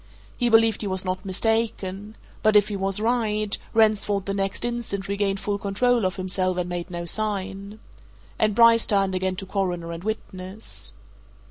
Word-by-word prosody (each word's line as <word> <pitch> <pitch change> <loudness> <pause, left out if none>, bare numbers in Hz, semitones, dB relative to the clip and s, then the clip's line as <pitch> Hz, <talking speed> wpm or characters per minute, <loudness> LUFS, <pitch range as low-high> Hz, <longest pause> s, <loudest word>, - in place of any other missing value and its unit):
He 240 -1 0
believed 225 -1 +4
he 210 - -2
was 190 0 0
not 185 +1 -2
mistaken 210 0 -2 0.3
but 215 -1 +3
if 205 0 +5
he 205 - -3
was 195 0 +4
right, 215 -2 +1 0.2
Ransford 210 -3 +2
the 195 - -2
next 195 +3 -2
instant 235 -5 -3
regained 200 -1 -1
full 205 0 -2
control 225 +3 +1
of 185 - -1
himself 185 -1 0
and 180 -1 -1
made 175 -1 -4
no 175 -1 -5
sign. 200 +1 -3 0.6
And 215 -2 +2
Bryce 230 0 +6
turned 195 -2 +2
again 185 0 -1
to 195 +1 -6
Coroner 180 -4 -2
and 165 +1 -7
witness. 195 -1 -4
200 Hz, 165 wpm, -24 LUFS, 190-215 Hz, 0.6 s, Bryce